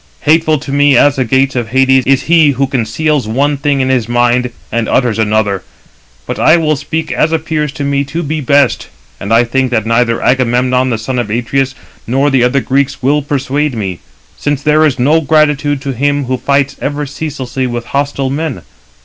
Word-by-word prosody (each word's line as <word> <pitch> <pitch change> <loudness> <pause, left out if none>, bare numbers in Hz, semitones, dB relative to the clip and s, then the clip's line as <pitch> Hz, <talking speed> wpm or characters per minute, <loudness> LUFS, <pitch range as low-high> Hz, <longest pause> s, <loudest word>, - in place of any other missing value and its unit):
Hateful 155 0 +2
to 135 0 -7
me 145 -1 +4
as 145 +1 +3
the 130 - +1
gates 130 +3 +1
of 120 -3 -2
Hades 130 +1 +2
is 135 -1 +2
he 160 -3 +4
who 135 - +2
conceals 135 +2 -1
one 140 +6 0
thing 140 0 0
in 130 - 0
his 125 -3 0
mind 120 +1 +1 0.2
and 115 -1 -1
utters 120 -4 +1
another. 105 -3 0 0.6
But - - -5
I 160 - +5
will 155 -2 +1
speak 155 +3 -4
as 155 - +1
appears 155 -2 -1
to 140 - -5
me 140 0 0
to 160 +5 -4
be 155 +1 -3
best; 140 -1 +2 0.3
and 100 - -6
I 115 +1 +5
think 130 +2 0
that 110 -3 -1
neither 115 0 +1
Agamemnon, 125 0 +1
the 115 - -1
son 125 +3 -3
of 120 -3 -3
Atreus, 130 +4 -1 0.3
nor 135 +4 +1
the 130 -2 +3
other 130 +3 +2
Greeks 135 0 -1
will 145 +3 +2
persuade 140 0 -2
me; 95 -5 -4 0.4
since 145 -1 -2
there 155 +1 +3
is 140 - -2
no 150 +6 +2
gratitude 145 -2 +1
to 135 -1 -3
him 145 +2 0
who 130 +1 -1
fights 140 +2 0
ever 145 +1 -2
ceaselessly 135 -3 -4
with 120 -1 -4
hostile 140 -1 -1
men. 155 -1 -4
135 Hz, 195 wpm, -13 LUFS, 125-145 Hz, 0.6 s, I